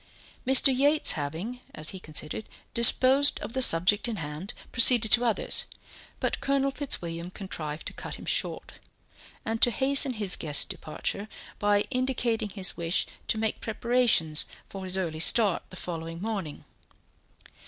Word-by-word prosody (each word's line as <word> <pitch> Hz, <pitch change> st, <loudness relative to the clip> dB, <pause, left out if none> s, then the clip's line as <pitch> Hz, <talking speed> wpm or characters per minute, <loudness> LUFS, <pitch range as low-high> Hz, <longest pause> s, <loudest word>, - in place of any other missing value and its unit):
Mr. 265 Hz, 0 st, +6 dB
Yates 290 Hz, +4 st, +4 dB
having, 165 Hz, +11 st, -5 dB, 0.2 s
as 155 Hz, 0 st, -2 dB
he 190 Hz, -, -8 dB
considered, 155 Hz, +5 st, -4 dB, 0.2 s
disposed 260 Hz, +4 st, +4 dB
of -, -, -7 dB
the 260 Hz, -, -1 dB
subject 200 Hz, +1 st, +5 dB
in 230 Hz, -, -3 dB
hand, 155 Hz, +2 st, -7 dB, 0.2 s
proceeded 235 Hz, -2 st, +6 dB
to 240 Hz, -, +5 dB
others, 230 Hz, -3 st, -1 dB, 0.5 s
but -, -, -2 dB
Colonel 275 Hz, 0 st, 0 dB
Fitzwilliam 170 Hz, -, -5 dB
contrived 165 Hz, -6 st, -7 dB
to -, -, -4 dB
cut -, -, -8 dB
him -, -, -11 dB
short, -, -, -3 dB, 0.7 s
and 225 Hz, +1 st, -3 dB
to -, -, +6 dB
hasten 270 Hz, +2 st, +3 dB
his 205 Hz, -5 st, +3 dB
guest's 145 Hz, -3 st, 0 dB
departure, 200 Hz, +6 st, -5 dB, 0.3 s
by 205 Hz, 0 st, +2 dB
indicating 250 Hz, -4 st, -1 dB
his 195 Hz, -1 st, 0 dB
wish 170 Hz, +1 st, -1 dB, 0.2 s
to -, -, 0 dB
make 220 Hz, 0 st, -2 dB
preparations 225 Hz, -9 st, +1 dB, 0.2 s
for 195 Hz, -1 st, -8 dB
his 185 Hz, 0 st, 0 dB
early 165 Hz, -4 st, -3 dB
start 205 Hz, +2 st, +4 dB
the -, -, -11 dB
following 165 Hz, -2 st, -6 dB
morning. 195 Hz, -7 st, -5 dB
205 Hz, 145 wpm, -27 LUFS, 170-245 Hz, 0.7 s, Mr